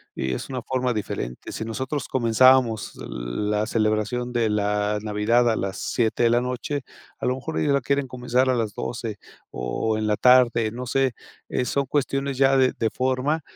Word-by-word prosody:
Y 65 -1 -2
es - - -5
una 130 -2 -3
forma 125 0 -1
diferente. 60 - -5
Si 110 - -5
nosotros 130 +4 -3
comenzábamos 120 -2 +3 0.2
la 105 - -2
celebración 115 +3 0
de 115 -2 +1
la 105 0 0
Navidad 110 +3 +2
a - - +1
las 95 0 -3
7 115 0 0
de 115 - +5
la 120 +1 +3
noche, 125 +3 -3 0.4
a - - -3
lo 125 - +1
mejor 155 +4 -5
ellos 145 -2 +2
la 140 - +2
quieren 140 +1 0
comenzar 125 +1 0
a 130 - +3
las 110 -4 -1
12, 115 -3 -4 0.3
o, 110 - -2
en 110 - -1
la 105 - +2
tarde, 120 -2 +4
no 125 +3 -6
sé. 135 0 +1 0.4
Eh, 125 - -1
son 140 +3 0
cuestiones 135 -1 -1
ya 135 0 +4
de 130 -1 +3
de 115 - +1
forma 130 +5 0
120 Hz, 185 wpm, -24 LUFS, 110-130 Hz, 0.4 s, de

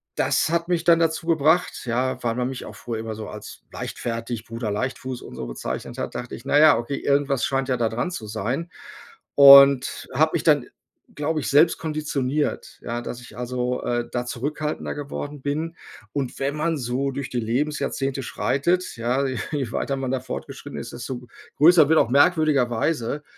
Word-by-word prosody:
das - - +1
hat 170 0 0
mich 175 -2 0
dann 170 -1 +5
dazu 165 0 0
gebracht, 160 +2 +2
ja, 125 +2 -1
weil 115 -1 0
man 125 0 -1
mich 130 - -6
auch - - -10
früher 115 -2 -5
immer 110 -1 -5
so 110 -1 -7
als - - -10
leichtfertig, 115 -1 -5
Bruder 115 -1 -4
Leichtfuß 130 +3 -3
und - - -10
so 60 - -5
bezeichnet - - -5
hat, - - -4
dachte 125 - -6
ich: 120 - -13
„Na 145 - +4
ja 155 -4 +7
okay, 125 +4 -3
irgendwas 140 -2 +1
scheint 135 0 -1
ja 125 - +1
da 115 -2 +1
dran 120 +11 -2
zu 115 -11 -6
sein.“ 120 - -3 0.7
Und 140 -1 +8
habe 155 +4 +3
mich - - 0
dann, 150 -5 +3 0.5
glaube 155 +2 -1
ich, - - -3
selbst 155 +4 +5
konditioniert, 150 -2 -2
ja, 120 0 -3
dass 120 0 -7
ich 125 - -13
also, 125 0 -2
äh, 120 -1 -1
da 125 0 -2
zurückhaltender 150 +5 -3
geworden 145 0 -6
bin. 155 +4 -3 0.4
Und 135 -4 -3
wenn 140 +2 -1
man 165 +1 0
so 130 +2 -2
durch 135 -1 -5
die 125 - -2
Lebensjahrzehnte 135 +2 -1
schreitet, 160 +8 -1
ja, 125 +4 0
je 130 -1 -3
weiter 135 - -1
man 130 -1 -3
da 130 - 0
fortgeschritten 135 +2 -7
ist, 120 - -7
desto 120 +1 -5
g 125 - -16 0.3
größer 160 0 +7
wird 160 - +5
auch 115 - +2
merkwürdigerweise 145 -2 +2
135 Hz, 185 wpm, -23 LUFS, 120-150 Hz, 0.7 s, Und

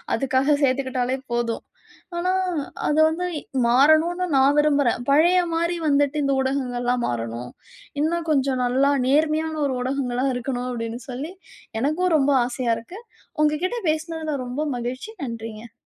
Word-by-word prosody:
அதுக்காக 270 +2 +2
சேர்த்துக்கிட்டாலே 260 -1 0 0.2
போதும். 235 -1 -1 0.5
ஆனா 360 +2 0 0.6
அது 300 +1 +2
வந்து 325 +3 -2 0.4
மாறணும்ன்னு 315 +9 +4
நான் 270 +2 +4
விரும்புறேன். 285 -5 +3
"பழைய 340 +6 +5
மாரி 340 +1 0
வந்துட்டு 285 0 +2
இந்த 275 - +1
ஊடகங்கள்லாம் 250 -2 -1
மாறணும். 115 +1 -4 0.5
இன்னும் 335 +2 0
கொஞ்சம் 270 -3 +1
நல்லா 265 +3 +3 0.2
நேர்மையான 310 +3 +2
ஒரு 270 -2 -1
ஊடகங்களா 255 -1 -1
இருக்கணும்." 245 0 -3
அப்படீன்னு 235 0 -4
சொல்லி 280 +8 -5 0.5
எனக்கும் 330 +6 +1
ரொம்ப 285 0 +3
ஆசையா 245 -1 -1
இருக்கு. 350 - -11 0.4
உங்க 300 +1 +1
கிட்ட 475 +6 -2
பேசுனதில 315 -2 -2
ரொம்ப 255 +5 -3
மகிழ்ச்சி, 250 - -5
நன்றிங்க. 225 -2 -7
275 Hz, 130 wpm, -23 LUFS, 245-310 Hz, 0.6 s, பழைய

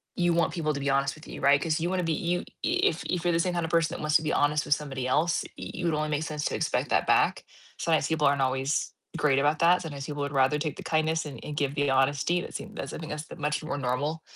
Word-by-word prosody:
you 175 -1 +2
want 170 -1 +2
people 155 -4 -1
to 140 - -4
be 140 - 0
honest 135 +1 +1
with 155 - -14
you, - - -7
right, 140 +1 +4
'cause 160 0 0
you 170 +2 -1
wanna 185 -1 0
be 165 - 0
you 175 +3 0
y - - -7 0.2
if 165 +3 +1
if 180 -2 -1
you're 175 - +2
the 165 - +2
same 180 +1 +1
kind 170 - -1
of 165 - -6
person 165 -2 +2
that - - -6
wants 150 0 +4
to - - -7
be 155 - -1
honest 150 +1 +2
with 145 - +3
somebody 135 -4 -4
else, 160 +6 +2
y - - -6
you'd 175 -2 -1
wanna 155 0 -1
make 150 +1 0
sense 150 -2 -4
to - - -1
expect - - -1
that - - +2
back, - - +3 0.3
sometimes 160 -3 +1
people 155 -2 +2
aren't 140 0 +2
always 135 +2 0 0.2
great 140 -3 +3
about 150 +2 +2
that, 175 +2 +5
sometimes 145 -4 -6
people 145 0 -5
would 140 0 -3
rather 135 +2 +3
take 150 -2 -2
the - - -9
kindness 160 0 0
and 145 -2 -7
and 150 - -5
give 140 -1 0
the 145 -1 +1
honesty, 140 +6 +2
that - - -8
seem - - -7
that's - - -5
I - - -6
think 155 - -7
that's 150 0 -5
the - - -10
much 150 0 -1
more 150 -2 -3
normal, 145 +4 -1
150 Hz, 290 wpm, -27 LUFS, 140-165 Hz, 0.3 s, that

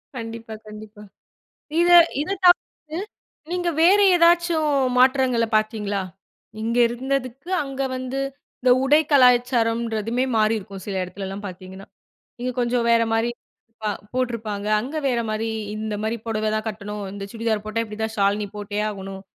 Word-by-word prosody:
கண்டிப்பா 225 -1 -7
கண்டிப்பா, 210 0 -11 0.8
இத 350 - +3 0.3
இத 390 +6 -2
தவிர்த்து, 330 -3 +2 0.5
நீங்க 355 -1 0
வேறு 400 +4 +6
ஏதாச்சும் 335 -2 +3 0.3
மாற்றங்கள 255 -2 +4
பாத்தீங்களா? 215 -2 0 0.6
இங்கே 235 +2 +1
இருந்ததுக்கு 260 +4 -3
அங்க 275 -1 -5
வந்து 255 +1 -4 0.4
இந்த 255 0 +4
உடை 295 +3 +5
கலாச்சாரம்ன்றதுமே 240 -3 +3
மாறியிருக்கும். 215 -3 -1
சில 200 -2 -4
இடத்துலலாம் 195 +2 -6
பாத்திங்கன்னா, 185 +1 -10 0.5
இங்க 250 +1 -1
கொஞ்சம் 240 -1 +1
வேற 230 0 +5
மாரி, 225 +2 +1 0.5
ப - - -3 0.3
போட்ருப்பாங்க, 225 -5 -2
அங்க 275 +6 -5
வேற 245 -2 +1
மாரி 220 +1 -2 0.3
இந்த 215 -1 -3
மாரி 220 +2 -1
புடவதான் 215 0 -1
கட்டணும், 210 -1 -6
இந்த 200 -1 -7
சுடிதார் 225 -2 -1
போட்டா, 230 +1 -1
இப்டி 210 0 -9
தான் 220 0 -3
ஷால் 200 +1 +2
நீ 205 - -3
போட்டே 205 0 -4
ஆகணும், 195 -1 -7
230 Hz, 135 wpm, -23 LUFS, 210-255 Hz, 0.8 s, வேறு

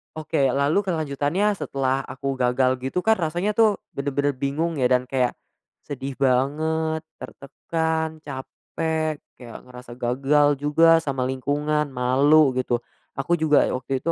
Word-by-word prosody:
Oke, 155 -3 0
lalu 140 +7 +2
kelanjutannya 160 +4 0
setelah 135 -1 -1
aku 135 0 -4
gagal 130 +1 +2
gitu 135 +8 -3
kan 220 -2 +3
rasanya 175 +6 -1
tuh 215 -1 +3 0.2
bener-bener 140 +1 -1
bingung 140 +4 -2
ya 125 - +3
dan 125 0 +2
kayak, 125 -2 0 0.5
sedih 140 -1 -5
banget, 155 +5 +1 0.2
tertekan, 160 +2 -3
capek, 155 +3 -4 0.2
kayak 120 -3 -9
ngerasa 125 -1 -11
gagal 140 +4 +2
juga 165 +3 +4
sama 135 -5 -3
lingkungan, 145 +3 -1
malu 135 +4 +4
gitu. 120 -1 0 0.4
Aku 140 +5 -1
juga 155 -2 +4
ya - - -2
waktu 130 +1 -2
itu 170 - +1
145 Hz, 135 wpm, -23 LUFS, 130-160 Hz, 0.5 s, juga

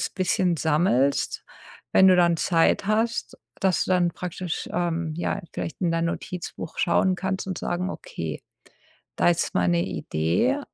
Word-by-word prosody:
bisschen 185 -2 +1
sammelst, 150 -4 +1 0.5
wenn 190 - +7
du 185 - +6
dann 170 -1 +4
Zeit 165 +4 +2
hast, 225 +2 0 0.2
dass 190 -2 +2
du 185 - 0
dann 175 -1 +3
praktisch, 180 0 -5
ähm, 170 -2 -1
ja, 170 - -2
vielleicht 165 - -5
in 175 - +1
dein 165 0 0
Notizbuch 170 -1 -5
schauen 185 +2 +3
kannst 190 +1 -3
und 185 -2 -3
sagen: 180 +2 -2
„Okay, - - -6 0.7
da - - +3
ist 170 - -1
meine 85 -1 +2
Idee. 90 - 0
175 Hz, 145 wpm, -25 LUFS, 165-185 Hz, 0.7 s, wenn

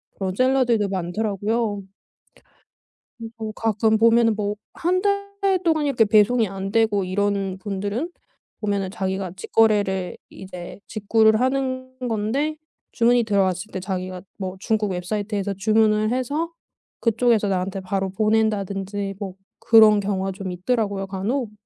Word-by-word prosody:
그런 190 -2 -3
셀러들도 250 -4 +2
많더라고요. 205 +3 -1 1.4
그래서 225 0 -8 0.2
가끔 220 0 +2
보면은 230 0 +4
뭐 205 -1 -2 0.2
1 365 +2 0
달 400 -1 0
동안 320 -3 +2
이렇게 270 -5 +3
배송이 220 +2 +4
안되고 200 +2 0
이러는 195 0 -1
분들은 205 - -3 0.5
보면은 200 -3 -1
자기가 190 -2 -3
직거래를 200 -3 +1
이제 180 -1 -9
직구를 220 +1 +3
하는 255 0 -1
건데 250 +9 -1 0.3
주문이 240 0 +3
들어왔을 200 -2 0
때 - - -4
자기가 185 -1 -4 0.2
뭐 190 -1 -5
중국 215 -1 0
웹사이트에서 200 +2 -2
주문을 215 +2 +2
해서 285 +7 -1 0.5
그쪽에서 230 -2 +2
나한테 190 +1 -2
바로 190 +1 -2
보낸다든지 200 -1 0
뭐 195 -3 -5 0.2
그런 220 -2 +6
경우가 195 -1 -1
좀 190 -1 -6
있더라고요 200 +1 -1
간혹. 210 +5 -2
210 Hz, 305 characters per minute, -23 LUFS, 195-230 Hz, 1.4 s, 그런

